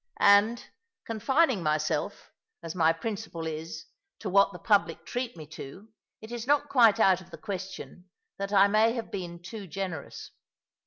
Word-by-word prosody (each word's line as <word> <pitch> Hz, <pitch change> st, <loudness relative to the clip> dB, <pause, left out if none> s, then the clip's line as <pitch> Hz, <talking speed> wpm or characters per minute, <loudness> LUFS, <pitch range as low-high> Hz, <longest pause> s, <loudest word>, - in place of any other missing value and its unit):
And, 205 Hz, +4 st, +4 dB, 0.4 s
confining 240 Hz, -, +1 dB
myself, 155 Hz, -1 st, -1 dB, 0.3 s
as 165 Hz, -1 st, -5 dB
my 165 Hz, -3 st, +4 dB
principle 175 Hz, -1 st, -5 dB
is, 160 Hz, 0 st, -6 dB, 0.3 s
to 195 Hz, -, -5 dB
what 200 Hz, +1 st, +5 dB
the 180 Hz, -, -9 dB
public 175 Hz, -3 st, +1 dB
treat 245 Hz, -3 st, -4 dB
me 155 Hz, -, -8 dB
to, 160 Hz, +7 st, -10 dB, 0.3 s
it 220 Hz, +2 st, -10 dB
is 240 Hz, 0 st, -5 dB
not 290 Hz, 0 st, +2 dB
quite 230 Hz, -4 st, +5 dB
out 190 Hz, -3 st, +4 dB
of 180 Hz, -, -16 dB
the -, -, -10 dB
question 190 Hz, -2 st, -7 dB, 0.3 s
that 200 Hz, 0 st, -3 dB
I 200 Hz, -1 st, +6 dB
may 215 Hz, +2 st, +3 dB
have 230 Hz, -3 st, -5 dB
been 175 Hz, -3 st, -5 dB
too 200 Hz, +2 st, -8 dB
generous. 180 Hz, -4 st, -6 dB
200 Hz, 160 wpm, -28 LUFS, 170-225 Hz, 0.4 s, I